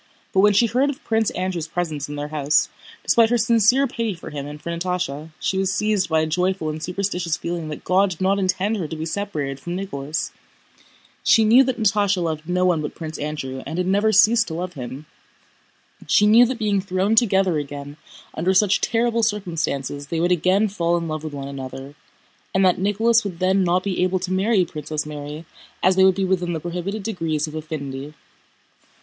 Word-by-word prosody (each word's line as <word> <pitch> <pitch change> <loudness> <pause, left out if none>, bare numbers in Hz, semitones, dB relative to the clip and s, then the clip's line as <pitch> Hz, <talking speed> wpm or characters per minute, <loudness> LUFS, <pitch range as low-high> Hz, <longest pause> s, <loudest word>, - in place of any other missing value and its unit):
But 190 - +3
when 205 +1 +5
she 205 +4 +4
heard 250 +5 +1
of 285 +2 -6
Prince 220 -1 +1
Andrew's 180 -3 -3
presence 160 -4 -3
in 145 - -5
their 145 0 -4
house, 150 -1 +2 0.3
despite 230 -1 +4
her 240 - +3
sincere 235 +3 +4
pity 230 -5 -3
for 170 - -10
him 145 -1 -5
and 150 +1 -8
for 170 - -5
Natásha, 170 -3 -3
she 190 - -1
was 190 0 0
seized 210 -4 +1
by 160 -1 +3
a - - +1
joyful 180 +1 0
and 155 0 -5
superstitious 180 -1 -2
feeling 170 -2 -4
that 150 - -7
God 190 +2 +3
did 175 - -7
not 195 +1 +2
intend 195 +3 0
her 175 -6 -3
to 160 - -6
be 155 0 -4
separated 160 -7 -3
from 175 +4 -5
Nicholas. 155 -6 -4 0.9
She 225 - +5
knew 240 +5 +7
that 255 -2 -2
Natásha 205 -2 +2
loved 160 0 -3
no 180 +1 +2
one 175 -4 +2
but 150 - -5
Prince 160 -1 -7
Andrew 140 -3 -4
and 160 - -4
had 180 - 0
never 205 +4 +2
ceased 225 +3 +5
to 160 - -5
love 180 +2 -4
him. 130 +2 -7 1.0
She 210 - +4
knew 230 +4 +7
that 260 0 -3
being 205 -3 +1
thrown 190 +2 0
together 195 -7 +3
again 145 0 -7 0.4
under 185 +4 0
such 195 0 +3
terrible 230 0 +1
circumstances 165 - -2
they 165 +2 -2
would 175 +2 +1
again 185 +5 +3
fall 175 -4 0
in 170 -1 -3
love 155 -1 -4
with 155 -2 -6
one 140 -1 -5
another, 135 0 -7 0.6
and 190 0 +4
that 180 -1 +3
Nicholas 220 +4 +2
would 190 -4 -5
then 190 +2 +2
not 180 +1 +1
be 195 -3 -1
able 185 +1 +1
to 185 0 -2
marry 195 0 +2
Princess 155 -1 -4
Mary 150 +1 -7 0.4
as 185 +1 +4
they 190 - +5
would 190 -1 +5
be 195 0 0
within 180 -2 0
the 160 - -2
prohibited 180 +5 -4
degrees 165 -7 -1
of 155 - -9
affinity. 150 -2 -6
180 Hz, 205 wpm, -22 LUFS, 155-200 Hz, 1.0 s, knew